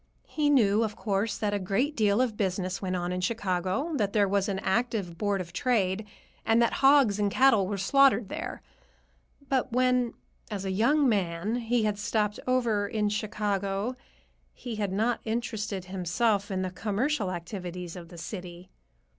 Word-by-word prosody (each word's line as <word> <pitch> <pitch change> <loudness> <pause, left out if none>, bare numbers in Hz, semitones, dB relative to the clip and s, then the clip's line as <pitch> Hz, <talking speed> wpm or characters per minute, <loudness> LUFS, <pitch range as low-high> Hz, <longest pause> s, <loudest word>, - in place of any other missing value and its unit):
He 300 -2 0
knew, 220 -7 +4
of 215 -2 -3
course, 205 0 -1
that 205 -1 -1
a 205 - 0
great 205 +11 0
deal 210 +1 +3
of 245 -4 0
business 185 -2 -2
went 185 -1 -2
on 175 0 -2
in 180 0 -2
Chicago, 190 - -1
that 205 -4 0
there 205 -2 +3
was 200 +1 +1
an 195 - -1
active 200 -3 -1
Board 205 +2 0
of 170 -2 -7
Trade, 210 -2 0 0.4
and 225 0 +3
that 235 - +3
hogs 270 -7 +5
and 205 -1 +2
cattle 225 -4 +4
were 200 0 -2
slaughtered 250 +3 +4
there. - - -6 0.8
But 265 -2 0
when, 250 -1 +2 0.3
as 200 -3 -4
a 190 - -1
young 270 +9 +3
man, 195 0 0
he 235 -1 0
had 210 -1 0
stopped 210 -1 0
over 235 -5 +1
in 210 0 0
Chicago, 205 +1 -2 0.6
he 235 -4 -6
had 205 -3 -1
not 225 +4 +1
interested 220 -4 -3
himself 195 +3 0
in 190 -1 -1
the 185 - -3
commercial 215 +3 -1
activities 180 0 -6
of 170 -2 -9
the 175 - -11
city. 180 +1 -8
205 Hz, 170 wpm, -28 LUFS, 190-230 Hz, 0.8 s, hogs